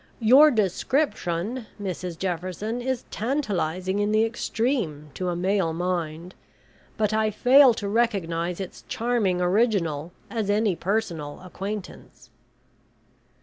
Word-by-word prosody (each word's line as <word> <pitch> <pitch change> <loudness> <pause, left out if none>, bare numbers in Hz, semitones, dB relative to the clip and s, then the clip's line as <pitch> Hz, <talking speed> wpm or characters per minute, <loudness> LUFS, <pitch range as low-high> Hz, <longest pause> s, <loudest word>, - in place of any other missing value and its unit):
Your 260 +7 +7
description, 220 - -1
Mrs 180 -3 -4
Jefferson, 185 +6 -3
is 260 0 -2
tantalising 195 - -1
in 205 0 +1
the 215 +1 +4
extreme 225 - -2
to 180 -1 -3
a 175 - -1
male 185 -1 +1
mind, 170 0 -3 0.6
but 215 -1 +1
I 220 0 +2
fail 250 +3 +6
to 205 - -4
recognise 180 -6 0
its 190 -2 -7
charming 225 -6 0
original 180 -6 +1 0.2
as 220 -4 -3
any 205 -2 +2
personal 170 -7 -2
acquaintance." 195 +2 -8
200 Hz, 110 wpm, -25 LUFS, 175-225 Hz, 0.6 s, Your